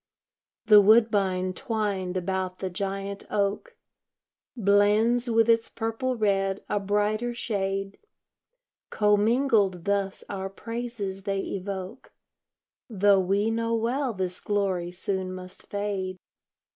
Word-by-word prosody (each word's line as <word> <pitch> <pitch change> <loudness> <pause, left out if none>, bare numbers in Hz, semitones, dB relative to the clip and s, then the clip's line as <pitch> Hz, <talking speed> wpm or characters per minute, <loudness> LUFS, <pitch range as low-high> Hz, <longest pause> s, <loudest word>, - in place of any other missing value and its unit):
The 210 -2 +8
woodbine 200 -4 +3
twined 195 -4 -2
about 185 0 -2
the 190 -1 -4
giant 195 +2 -4
oak 205 - -1 0.8
Blends 215 +4 +3
with 225 -1 +3
its 230 0 +3
purple 230 +3 -2
red 195 -3 0
a 205 - 0
brighter 210 +4 0
shade. 195 -3 -2 0.9
Co 210 -1 +3
mingled 210 -5 +2
thus 200 -1 -1
our 195 -1 -4
praises 230 -2 -5
they 195 0 -2
evoke, 195 +5 -6 0.8
Tho' 200 -2 +4
we 200 +4 +1
know 230 0 0
well 245 +4 0
this 185 -1 -3
glory 195 -4 -1
soon 185 0 -2
must 185 +1 -10
fade. 200 -2 -3
200 Hz, 110 wpm, -26 LUFS, 190-225 Hz, 0.9 s, The